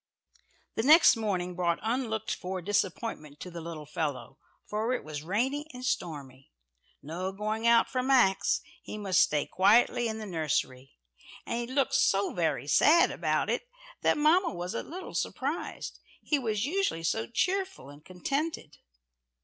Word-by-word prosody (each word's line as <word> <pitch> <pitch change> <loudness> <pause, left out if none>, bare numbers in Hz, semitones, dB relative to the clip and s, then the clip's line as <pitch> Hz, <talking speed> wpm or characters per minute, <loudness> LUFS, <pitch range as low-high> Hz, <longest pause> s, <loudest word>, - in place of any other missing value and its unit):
The - - -1
next 310 +7 +7
morning 185 -5 -2
brought 170 -2 +1
unlooked 225 -2 -1
for 185 +1 -4
disappointment 185 -5 -2
to 180 - -7
the 170 0 -7
little 160 -2 -7
fellow, 140 -5 -4 0.3
for 220 +4 -1
it - - -2
was 150 -1 -6
rainy 255 - -1
and 250 0 -6
stormy. 140 - -4 0.5
No 175 +5 -4
going 215 +3 -2
out 235 0 +5
for 255 - -1
Max 240 -7 +3 0.2
he - - -7
must 195 -3 +2
stay 150 -1 +2
quietly 225 +5 +3
in 220 -1 -3
the 220 - -6
nursery. 145 -7 -2 0.5
And 235 - -2
he 240 - -3
looked 275 -1 +2
so 200 -6 +2
very 155 -7 0
sad 310 - +5
about - - 0
it - - -2 0.3
that - - +3
mamma 330 +5 +3
was 175 0 -5
a - - -2
little 360 +4 -8
surprised: - - -3 0.2
he 295 - +1
was 220 -3 -1
usually 345 - -1
so 115 -8 0
cheerful 375 - -1
and 145 +1 -15
contented. 185 - -4
200 Hz, 155 wpm, -29 LUFS, 165-255 Hz, 0.5 s, next